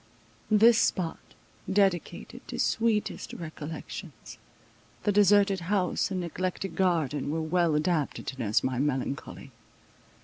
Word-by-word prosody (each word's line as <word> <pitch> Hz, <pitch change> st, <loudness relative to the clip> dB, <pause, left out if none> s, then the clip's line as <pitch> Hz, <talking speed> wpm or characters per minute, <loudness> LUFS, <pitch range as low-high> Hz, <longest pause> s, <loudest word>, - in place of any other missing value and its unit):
This 225 Hz, +2 st, +6 dB
spot, 170 Hz, -3 st, 0 dB, 0.5 s
dedicated 190 Hz, -3 st, 0 dB
to -, -, -6 dB
sweetest 225 Hz, -2 st, 0 dB
recollections, 160 Hz, -1 st, -8 dB, 0.6 s
the 205 Hz, -, +2 dB
deserted 200 Hz, -1 st, +4 dB
house 180 Hz, +1 st, 0 dB
and 185 Hz, -2 st, -2 dB
neglected 180 Hz, +1 st, -3 dB
garden 160 Hz, -6 st, 0 dB
were 160 Hz, +2 st, -1 dB
well 165 Hz, 0 st, +1 dB
adapted 155 Hz, -1 st, 0 dB
to 130 Hz, -, -6 dB
nurse 105 Hz, -3 st, +1 dB
my 130 Hz, -1 st, -1 dB
melancholy. 135 Hz, -1 st, -3 dB
175 Hz, 110 wpm, -28 LUFS, 150-195 Hz, 0.6 s, This